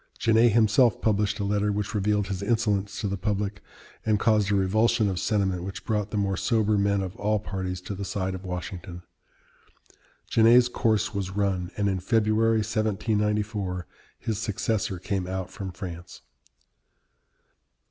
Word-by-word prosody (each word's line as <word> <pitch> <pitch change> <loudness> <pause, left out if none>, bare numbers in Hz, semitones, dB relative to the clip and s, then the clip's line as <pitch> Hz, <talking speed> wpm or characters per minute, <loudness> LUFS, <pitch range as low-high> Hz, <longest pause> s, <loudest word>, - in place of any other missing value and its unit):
Genet 115 0 +4
himself 115 +1 +4
published 105 0 +1
a - - -1
letter 105 +1 +1
which 105 +2 -3
revealed 105 0 +1
his 95 -1 -4
insolence 100 -2 0
to 105 - -1
the 100 -1 -3
public, 100 0 -2 0.4
and 110 -2 +2
caused 105 -3 +3
a - - +3
revulsion 105 +3 +2
of 95 -2 -1
sentiment 95 -5 0
which 95 +1 -7
brought 105 -2 -1
the 105 - -3
more 100 -1 0
sober 110 +1 +1
men 100 -1 +1
of 95 +2 -6
all 105 +1 +1
parties 95 -3 -4
to 90 +3 -6
the 100 +1 -5
side 95 -1 -2
of 95 +1 -7
Washington. 90 -1 -6 1.2
Genet's 120 +2 +5
course 110 -2 +1
was 100 -2 -2
run, 95 -2 -1
and 100 -1 +1
in 95 -1 0
February, 110 +2 +2
1794, 105 -3 -1 0.3
his 110 -3 -3
successor 105 -2 -1
came 95 0 -3
out 95 0 -4
from 95 -2 -6
France. 85 -1 -8
100 Hz, 155 wpm, -26 LUFS, 95-110 Hz, 1.2 s, Genet's